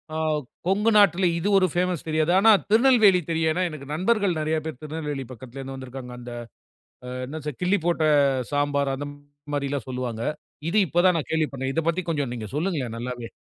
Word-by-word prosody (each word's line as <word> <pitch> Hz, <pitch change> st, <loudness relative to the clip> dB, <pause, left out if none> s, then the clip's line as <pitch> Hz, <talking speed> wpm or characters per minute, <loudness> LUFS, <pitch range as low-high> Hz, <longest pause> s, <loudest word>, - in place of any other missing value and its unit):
ஆ -, -, -1 dB, 0.5 s
கொங்கு 205 Hz, +4 st, +3 dB
நாட்டில 190 Hz, -2 st, +5 dB
இது 170 Hz, -, -2 dB
ஒரு 185 Hz, -1 st, +4 dB
பேமஸ் 180 Hz, -2 st, -1 dB
தெரியாது. 155 Hz, +1 st, +1 dB
ஆனா 220 Hz, +3 st, +7 dB, 0.2 s
திருநெல்வேலி 220 Hz, -4 st, +6 dB
தெரியும். 160 Hz, -1 st, +1 dB
ஏன்னா 180 Hz, +3 st, 0 dB
எனக்கு 145 Hz, -4 st, -9 dB
நண்பர்கள் 190 Hz, 0 st, +1 dB
நிறைய 155 Hz, +1 st, 0 dB
பேர் 155 Hz, -5 st, -6 dB
திருநெல்வேலி 150 Hz, -3 st, -4 dB
பக்கத்தில 130 Hz, +2 st, -10 dB
இருந்து 135 Hz, 0 st, -7 dB
வந்திருக்காங்க. 130 Hz, -1 st, -8 dB
அந்த 120 Hz, 0 st, -9 dB, 1.0 s
என்ன 150 Hz, +2 st, -5 dB
கிள்ளி 190 Hz, +3 st, +3 dB
போட்ட 170 Hz, -2 st, +1 dB, 0.5 s
சாம்பார். 145 Hz, -1 st, +1 dB
அந்த 145 Hz, +2 st, -5 dB, 0.5 s
மாரிலாம் 140 Hz, -2 st, -2 dB
சொல்லுவாங்க. 125 Hz, -3 st, -4 dB, 0.5 s
இது 210 Hz, -, +2 dB
இப்போ 170 Hz, -, -1 dB
தான் 180 Hz, -2 st, +4 dB
நான் 155 Hz, -, -5 dB
கேள்விப்படுறேன். 140 Hz, -4 st, -1 dB
இத 165 Hz, -, +2 dB
பத்தி 170 Hz, +2 st, 0 dB
கொஞ்சம் 145 Hz, -5 st, -1 dB
நீங்க 110 Hz, -3 st, -5 dB
சொல்லுங்களேன் 150 Hz, -9 st, -2 dB
நல்லாவே. 120 Hz, -1 st, -5 dB
155 Hz, 170 wpm, -25 LUFS, 135-180 Hz, 1.0 s, ஆனா